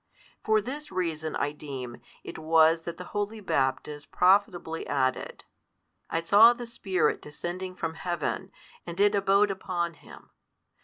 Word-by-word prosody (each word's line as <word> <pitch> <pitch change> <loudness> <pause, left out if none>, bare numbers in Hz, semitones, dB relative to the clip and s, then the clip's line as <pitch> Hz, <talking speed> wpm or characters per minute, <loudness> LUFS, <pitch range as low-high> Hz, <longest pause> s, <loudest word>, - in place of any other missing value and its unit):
For 220 0 +3
this 290 +7 -7
reason, 160 -4 -2
I 145 - 0
deem, 135 -5 -8 0.2
it - - -8
was 160 +1 +4
that 170 - -7
the 180 - -7
holy 205 +2 -2
Baptist 145 -3 -2
profitably 180 -3 +2
added, 130 -3 -1 0.7
I 165 - -1
saw 210 +7 +7
the 240 0 -7
Spirit 195 -8 0
descending 180 +5 -6
from 165 -2 -3
Heaven, 175 -1 -3 0.4
and 170 +2 -7
It 205 +1 +4
abode 200 0 +3
upon 175 -3 -3
Him. - - -16
175 Hz, 140 wpm, -27 LUFS, 155-200 Hz, 0.7 s, saw